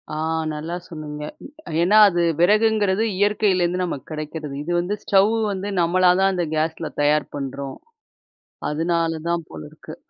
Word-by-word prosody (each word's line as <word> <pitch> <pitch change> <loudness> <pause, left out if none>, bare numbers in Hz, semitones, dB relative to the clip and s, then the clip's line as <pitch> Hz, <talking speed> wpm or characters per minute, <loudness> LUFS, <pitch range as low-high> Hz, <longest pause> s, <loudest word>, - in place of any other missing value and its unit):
ஆ, - - -4 0.3
நல்லா 155 +3 -5
சொன்னீங்க. 150 -2 -7 0.2
ம். - - -9 0.3
ஏன்னா, 200 +5 +4
அது 175 -1 0 0.2
விறகுங்கிறது 210 +1 +3
இயற்கையிலேருந்து 185 -3 +1
நமக்கு 155 -7 -5
கிடைக்கிறது. 155 -1 -5
இது 175 - -4
வந்து 180 +4 -2
ஸ்டவ் 200 +3 +3 0.2
வந்து 200 +1 -4
நம்மளா 180 +1 +4
தான் 195 - +4
அந்த 175 -2 -1
கேஸ்ல 160 0 -2
தயார் 150 0 +2
பண்றோம். 140 0 -5 0.9
அதனாலதான் 165 +1 -1
போல 80 - -9
இருக்கு. - - -11
170 Hz, 135 wpm, -22 LUFS, 155-190 Hz, 0.9 s, ஏன்னா